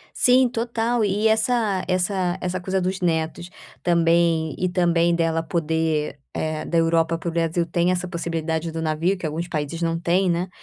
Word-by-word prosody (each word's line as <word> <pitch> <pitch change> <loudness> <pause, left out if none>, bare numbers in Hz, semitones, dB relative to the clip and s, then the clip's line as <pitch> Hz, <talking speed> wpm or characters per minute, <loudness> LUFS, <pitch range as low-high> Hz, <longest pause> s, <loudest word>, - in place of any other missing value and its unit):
Sim, 255 +1 +5
total. 235 -1 -1
E 205 +2 +1
essa 220 -3 +1
essa 185 0 0
essa 180 +1 -3
coisa 190 +1 -1
dos 185 +1 -2
netos 165 0 -1 0.3
também, 165 -2 +2
e 185 - 0
também 170 -1 +2
dela 165 -1 +1
poder 160 -2 -1 0.2
eh, 155 0 -2
da 170 - 0
Europa 165 0 +2
para 170 - -4
o - - -4
Brasil 170 +1 0
tem 170 +1 0
essa 180 0 -1
possibilidade 165 -2 -3
do 165 - -5
navio 160 +4 0
que 180 - -6
alguns 160 +3 -3
países 160 0 -4
não 165 0 0
têm, 180 +2 +1
né, 175 +2 -1
170 Hz, 175 wpm, -23 LUFS, 165-185 Hz, 0.3 s, Sim